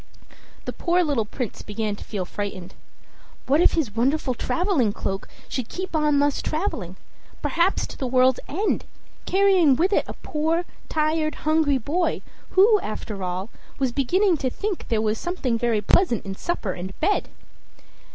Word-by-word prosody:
The - - -3
poor 355 +1 +2
little 280 -9 +1
Prince 240 +1 -5
began 210 0 -3
to - - -10
feel 195 -4 -4
frightened. 195 -1 -5 0.7
What 290 +5 +3
if - - +5
his 265 -11 -1
wonderful 260 +3 +1
traveling 310 - +1
cloak 195 0 -3 0.2
should 255 -4 -4
keep 370 -2 -5
on 300 -2 +3
thus 285 0 +2
traveling, 255 - -2 0.5
perhaps 345 +3 +2
to - - -10
the 265 - -1
world's 255 0 +4
end, 395 +8 0 0.4
carrying 380 -7 +5
with 365 +9 +2
it - - +3
a - - -5
poor, 320 +3 -1 0.2
tired, 310 0 +1
hungry 310 -3 +3
boy, 320 +7 -1 0.3
who, 415 +3 +6
after 210 - -5
all, 185 +4 -3 0.3
was 265 -2 +1
beginning 345 - +2
to 265 -3 -1
think 405 +7 -4
there 220 -2 +1
was 215 0 0
something 320 -9 -1
very 230 -3 +1
pleasant 235 - +2
in 195 - -4
supper 210 - -2
and 185 +1 -7
bed! 405 +6 +1
280 Hz, 160 wpm, -24 LUFS, 220-345 Hz, 0.7 s, who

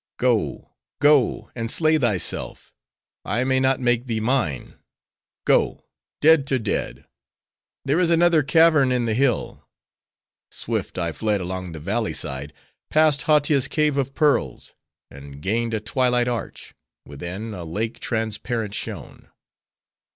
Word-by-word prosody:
"Go, - - 0 0.3
go,—and 130 -5 +2
slay 155 +3 +2
thyself: 105 - -2 0.5
I 120 +4 -1
may 130 0 +1
not 130 0 +2
make 120 0 +1
thee 115 -2 -1
mine;—go,—dead 135 - -1
to 135 - +1
dead!—There 135 - -5
is 180 -2 +2
another 170 -1 +4
cavern 150 -1 +4
in 125 -1 +1
the 110 - 0
hill." 125 -1 0 0.9
Swift - - -4
I 85 -2 -1
fled 105 +4 -1
along 90 -1 -5
the 80 - -7
valley 105 +7 -2
side; 70 +2 -4 0.4
passed 155 -4 +3
Hautia's 145 -3 +3
cave 150 -2 +1
of 135 0 -3
pearls; 145 - 0 0.4
and 70 0 -11
gained 115 +7 -1
a - - -1
twilight 125 +2 +1
arch; 120 -2 -5 0.3
within, 90 +10 -7
a 90 -3 -7
lake 105 +8 -4
transparent 110 -1 -3
shone. - - -7
120 Hz, 120 wpm, -23 LUFS, 105-140 Hz, 0.9 s, another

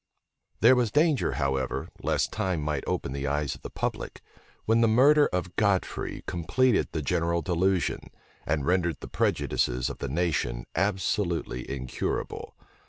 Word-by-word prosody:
There 120 +4 +7
was 125 -3 +2
danger, 150 +2 +2
however, 65 -3 -1
lest - - 0
time 95 -3 -1
might 75 -2 -2
open - - -2
the 70 +1 -3
eyes 75 -1 -1
of - - -12
the - - -7
public; - - -4 0.4
when 115 +1 +3
the 115 - +5
murder 140 +7 +5
of 90 0 -3
Godfrey 100 -3 0
completed 110 +8 +1
the 80 - -3
general 85 +3 0
delusion, 90 +1 0 0.3
and 75 -2 -1
rendered 85 -3 +1
the - - -7
prejudices 60 0 0
of - - -10
the 70 - -3
nation 70 -7 -1
absolutely 95 - -1
incurable. 65 -2 -4
85 Hz, 145 wpm, -27 LUFS, 70-105 Hz, 0.4 s, There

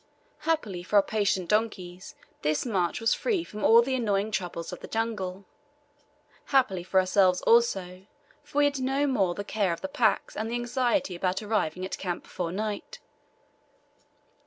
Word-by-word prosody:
Happily 215 - 0
for 185 +4 -4
our 200 - +7
patient 200 -4 0
donkeys 190 -4 -2 0.3
this 150 - 0
march 185 -7 0
was 225 - +2
free 410 -8 0
from 210 -9 -8
all 230 +1 +7
the 265 +2 -2
annoying 215 -4 0
troubles 175 -4 -4
of - - -7
the - - -9
jungle. 200 -4 -3 1.0
Happily 250 -10 +2
for 190 +1 +2
ourselves 185 -1 +3
also, 190 -5 +2 0.4
for - - -9
we 290 - +5
had 285 -1 0
no 270 +2 +1
more 200 -11 +1
the 205 - -4
care 205 -4 0
of 170 - -7
the - - -3
packs 190 - +1
and 220 +1 -3
the 235 - -2
anxiety 240 - 0
about 185 +3 -1
arriving 185 -5 -1
at 190 - -5
camp 180 -2 -3
before 170 -2 -4
night. 210 +2 -4
205 Hz, 165 wpm, -27 LUFS, 185-235 Hz, 1.0 s, our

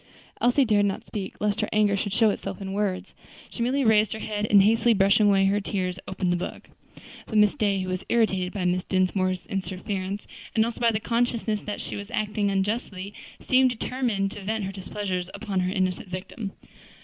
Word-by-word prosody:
Elsie 245 +3 +4
dared 205 -3 +3
not 195 - -3
speak 195 -3 -6
lest 210 +1 0
her 210 - -1
anger 210 -1 +3
should 200 +1 -2
show 220 +1 +4
itself - - -5
in 195 -1 -5
words; 200 -2 -2 0.4
so - - -6
merely 265 +4 +1
raised 220 -2 +4
her - - -5
head, 210 -1 -2
and 200 -1 +7
hastily 225 +2 +4
brushing 200 +2 +4
away 195 -1 +4
her 200 +2 +2
tears, 185 -2 -2
opened 185 -2 0
the - - +1
book. 175 - -7 0.6
But 220 - -1
Miss 210 -1 +5
Day, 200 -2 +1
who 185 - -4
was 185 +1 -3
irritated 190 -6 +2
by 200 - -4
Mrs. 180 +1 0
Dinsmore's 185 0 +1
interference, 195 0 -4 0.3
and 220 -1 +4
also 235 0 -4
by 235 - +5
the 215 -2 0
consciousness 230 -2 0
that 210 - -5
she - - -5
was 200 +1 -7
acting 210 -3 0
unjustly, 200 0 -2 0.3
seemed 260 0 +5
determined 235 -5 -1
to 205 - -8
vent 215 +1 -2
her 190 - -3
displeasure 190 -1 -3
upon 200 -2 -2
her 180 0 0
innocent 185 -1 -1
victim. 190 +3 -6
205 Hz, 195 wpm, -26 LUFS, 190-220 Hz, 0.6 s, and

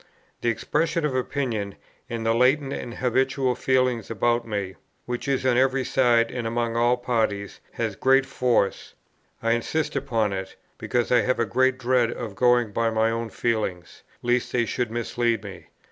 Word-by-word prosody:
The 120 - +1
expression 150 +8 0
of 145 - -1
opinion, 125 -6 -2 0.3
and 115 -1 -4
the 115 - +3
latent 135 +4 +2
and 120 -1 -6
habitual 130 +1 +1
feeling 130 -2 +1
about 120 +2 0
me, 100 -3 -3 0.3
which 120 +3 -4
is 135 -1 0
on 125 -2 +3
every 130 +1 +2
side 120 -3 +3
and 120 -2 -3
among 115 0 -1
all 120 +1 +3
parties, 110 -5 -1
has 110 -3 -2
great 135 +4 +3
force. 125 -6 0 0.5
I 115 - +2
insist 145 +8 -1
upon 115 -7 0
it, 95 0 -5 0.2
because 120 -1 -1
I 125 - +6
have 130 - 0
a 115 - +1
great 130 +6 +2
dread 125 -2 +2
of 115 -4 -6
going 120 -1 +3
by 115 +2 +1
my 110 0 +1
own 115 0 -3
feelings, 105 -7 -2 0.2
lest 120 0 +1
they 120 -1 +2
should 120 +1 -2
mislead 120 -1 -1
me. 100 -2 -10
120 Hz, 170 wpm, -25 LUFS, 115-130 Hz, 0.5 s, I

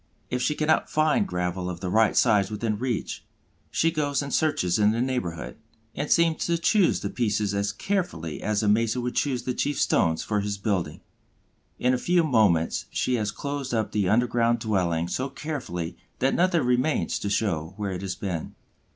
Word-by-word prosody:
If 125 - -1
she 150 - +1
cannot 155 +1 +1
find 155 +8 +2
gravel 90 +1 -2
of 85 -1 -5
the 90 -1 -3
right 110 +1 +3
size 105 -5 +4
within 105 0 -2
reach, 125 -3 -3 0.5
she 165 - +2
goes 145 -3 0
and 140 - -5
searches 110 - +1
in 105 0 +5
the 115 - -1
neighborhood, 125 -10 -3 0.4
and 145 - -3
seems 165 -2 +3
to 170 0 +2
choose 185 +2 +3
the - - -2
pieces 105 -4 0
as 100 0 0
carefully 105 - -3
as 105 0 0
a - - +1
mason 115 +3 +2
would 125 - -2
choose 130 -4 0
the 125 - -2
chief 145 +3 -1
stones 80 -1 +2
for 105 -1 0
his 100 0 -2
building. 95 -7 -2 0.8
In 125 +1 +2
a 125 - 0
few 175 +4 +2
moments 105 - +2
she 130 - -1
has 105 -2 -1
closed 140 +2 -4
up 110 -1 -1
the 100 -4 +1
underground 120 +1 +2
dwelling 90 -7 0
so 130 +9 -2
carefully 130 - -5 0.2
that 135 +1 +1
nothing 175 -3 +2
remains 125 +5 +1
to 100 - -3
show 95 -5 -1
where 100 -2 -2
it 90 -1 -4
has 95 -1 -3
been. 90 -5 -4
110 Hz, 185 wpm, -26 LUFS, 95-140 Hz, 0.8 s, in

